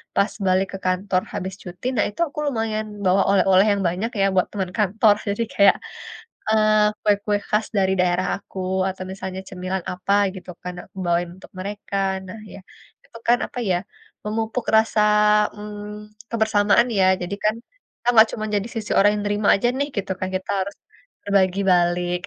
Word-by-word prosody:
pas 200 - +2 0.2
balik 185 +1 +2
ke - - -4
kantor 185 0 +1
habis 190 -2 -4
cuti, 180 +5 -11
nah 210 - +3
itu 210 - -16
aku 290 - -17
lumayan 225 -4 -1 0.2
bawa 190 +2 +4
oleh-oleh 195 0 +5
yang 200 -1 0
banyak 190 +7 -2
ya - - +4
buat 185 - +3
teman 190 -3 -3
kantor, 210 +1 +4
jadi 205 +3 0
kayak, 200 -1 +6 0.7
eee, 215 -1 +3
kue-kue 205 0 +2
khas 215 +1 +1
dari 190 -1 +2
daerah 180 0 +1
aku, 190 - -12 0.3
atau 190 0 -6
misalnya 190 -1 -6
cemilan 185 -1 -4
apa 185 +2 -1 0.2
gitu 185 -1 -9
kan, 180 - -4
nah - - -11
aku - - -34
bawain 175 0 +1
untuk 190 - -16
mereka. 200 0 -5 0.3
Nah 185 +4 -9
ya, - - -9 0.5
itu 230 - -13
kan 240 - +5
apa - - -9
ya, 180 - +3 0.5
memupuk 220 +3 -2
rasa, 220 0 +3 0.6
mmm, 210 0 -8 0.5
kebersamaan 220 0 +3
ya, 190 - +5 0.2
jadi 180 +3 -3
kan 215 +1 +3 0.4
kita 245 - -6
enggak 220 -1 +7
cuma 215 - -4
jadi 205 +3 -1
sisi 215 -2 -5
orang 205 +1 +6
yang 205 - -3
nerima 205 0 0
aja 240 +5 +1
nih 285 - 0
gitu 195 -1 -3
kan, 185 - -2
kita 185 +1 -3
harus 200 +2 -4 0.5
berbagi 195 -1 +2
balik. 175 0 +2
200 Hz, 180 wpm, -22 LUFS, 185-215 Hz, 0.7 s, enggak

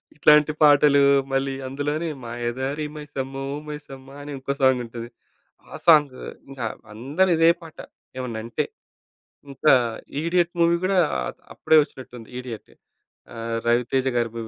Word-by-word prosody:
ఇట్లాంటి 150 0 +5
పాటలు 145 -1 +6 0.3
మళ్ళీ 135 0 0
అందులోనే 145 +5 -2
మాయదారి 120 +5 -3
మైసమ్మో 135 -2 -6 0.2
మైసమ్మ 140 -3 -9
అని 145 +1 -8
ఇంకో 135 +1 -3
సాంగుంటది. 120 -3 0 0.6
ఆ - - -7
సాంగు. 150 -6 +5 0.3
ఇంకా 135 -4 -5 0.3
అందరిదే 165 - +2
పాట 165 -1 -13 0.4
ఏమన్నంటే. 115 -2 -3 0.9
ఇంకా 140 +2 +4 0.5
'ఇడియట్' 170 +1 +1
మూవీ 170 0 +4
గూడా 190 +1 +1 0.2
అ - - -2 0.3
అప్పుడే 160 - +3
వచ్చినట్టుంది. 125 -5 -12
'ఇడియట్' 125 -3 -8 0.6
ఆహ్, 115 0 -3
రవితేజ 125 +2 +1
గారి 120 -1 +1
మూవీ 115 -1 -5
135 Hz, 115 wpm, -23 LUFS, 120-150 Hz, 0.9 s, పాటలు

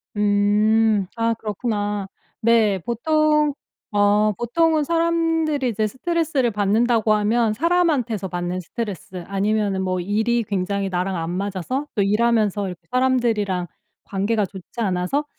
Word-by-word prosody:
음. 210 +1 +3
아 230 0 +1
그렇구나. 210 -2 -3 0.3
네. 220 -4 +3
보통 300 - +1 0.4
어 205 +1 +3
보통은 315 +5 +1
사람들이 330 -4 +1
이제 215 -1 0
스트레스를 290 - 0
받는다고 215 +2 +2
하면 215 +1 +2
사람한테서 290 - +1
받는 175 0 -3
스트레스 185 -2 -6
아니면은 200 0 0
뭐 185 -1 -1
일이 220 +5 0
굉장히 200 0 -2
나랑 185 +1 -1
안 165 0 -3
맞아서 200 - -3
또 205 - +2
일하면서 210 -1 +2
이렇게 180 -1 -8
사람들이랑 230 -8 +1 0.4
관계가 205 +2 0
좋지 190 +5 -11
않아서 190 +9 0
215 Hz, 305 characters per minute, -22 LUFS, 195-245 Hz, 0.4 s, 음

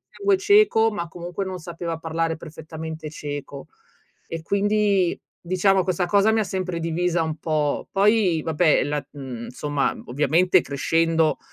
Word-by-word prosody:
sangue 400 -1 +1
ceco, 405 - +4
ma 170 -4 -4
comunque, 175 +3 -5
non 185 -1 -5
sapeva 170 -1 -5
parlare 165 0 -2
perfettamente 160 0 -8
ceco 145 -2 -7 0.6
e 165 -1 -5
quindi, 200 -1 +1 0.2
diciamo, 185 +2 +2
questa 180 -1 0
cosa 200 +4 +4
mi 225 - +2
ha - - +1
sempre 185 -2 -3
divisa 170 +1 0
un 155 0 -4
po'. 150 -2 -1
Poi 200 -4 +3
vabbè, 160 0 +2
la 145 +1 -2
mhmm, 130 -5 -7
insomma, 140 +3 -1
ovviamente 150 +8 +3
crescendo 165 +3 +1
165 Hz, 140 wpm, -23 LUFS, 155-190 Hz, 0.6 s, ceco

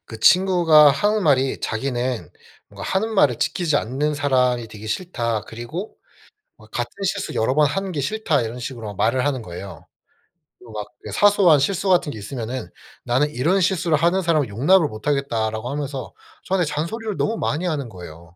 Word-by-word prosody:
그 110 -1 -10
친구가 175 - +6
하는 205 +9 +1
말이 135 -4 +2
자기는 120 - -2 0.4
뭔가 - - -11
"하는 220 +4 -1
말을 140 - +3
지키지 165 -5 0
않는 145 +6 -1
사람이 125 -4 +1
되기 105 0 -10
싫다. 115 - -2
그리고 150 - -7 0.6
뭐 110 - -18
같은 120 +2 -3
실수를 195 0 -2
여러 115 +4 +2
번 150 -1 +5
하는 195 +6 -3
게 150 -5 -2
싫다." 165 - 0
이런 115 +2 -5
식으로 115 -5 -6
말을 125 +6 +1
하는 135 -4 -1
거예요. 95 0 -9 0.7
또 120 -2 -14
막 105 -1 -5 0.2
그 - - -7
사소한 200 -7 +5
실수 190 +6 0
같은 175 -5 +3
게 - - -8
있으면은 115 -1 -5 0.3
"나는 130 +5 +1
이런 165 +9 +1
실수를 170 -4 +2
하는 175 +4 +2
사람을 155 -6 +1
용납을 150 - +3
못하겠다."라고 115 -2 -2
하면서 140 -3 -5 0.3
저한테 185 -2 +1
잔소리를 195 +9 -3
너무 225 +1 0
많이 160 +5 -1
하는 145 -8 -2
거예요. 85 -3 -12
140 Hz, 370 characters per minute, -22 LUFS, 115-175 Hz, 0.7 s, 친구가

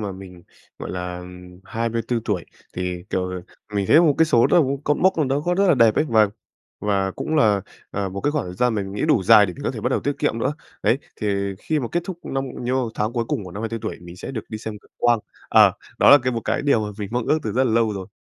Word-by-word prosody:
mà 100 -2 -3
mình, 90 -2 -11 0.4
gọi - - -6
là, 90 0 -4
ừm, 90 0 -12
24 115 +2 -2
tuổi, 95 -6 -1 0.3
thì, 90 -1 -3
kiểu, 90 -1 -2 0.3
mình 100 -2 0
thấy 155 - +7
một 155 -5 +4
cái 160 - +6
số 120 -6 +4
đó, 170 - +5 0.2
cột 150 - +2
mốc 190 +1 +3
nào 150 - +2
đó 135 +2 0
có 175 - +1
rất 195 +1 +3
là - - +6
đẹp 115 -4 +5
ấy - - +2
và 110 -3 +4 0.5
và 100 -2 +1
cũng 155 +10 -4
là, 105 -8 +4 0.3
à, 100 -1 -2
một 100 +1 -5
cái 145 - +1
khoảng 150 -1 -1
thời 90 - -7
gian 120 +3 +1
mình 100 -2 -3
nghĩ 105 - -3
đủ 135 -10 +3
dài 105 +1 +7
để 90 - -5
mình - - -10
có - - +1
thể - - -6
bắt - - 0
đầu - - 0
tiết - - -1
kiệm - - 0
nữa. - - 0 0.3
Đấy, - - +3 0.2
thì 100 -2 -1
khi 155 +4 -1
mà 120 - -3
kết 175 - +1
thúc 185 -3 -6
năm 135 0 -2 0.2
nhiêu 125 -2 0
tháng 105 +2 -1
cuối 120 -2 -1
cùng 105 - -2
của 90 - -9
năm 105 +3 -6
24 115 0 -3
tuổi - - -4
mình 85 0 -11
sẽ 90 - -7
được 115 -5 -4
đi 110 - -5
xem 110 -1 -6
cực - - -26
quang. 120 -1 +3 0.3
Ờ, - - +6 0.3
đó - - +6
là 145 - +10
cái 130 0 0
một 115 - -2
cái - - 0
điều 140 -6 +3
mà 105 - -6
mình 100 -2 -4
mong 120 -1 -1
ước 155 - +3
từ 110 - -3
rất 130 +3 +2
là 115 - +1
lâu 115 -1 +2
rồi. 95 -2 -6
110 Hz, 280 wpm, -22 LUFS, 95-130 Hz, 0.5 s, là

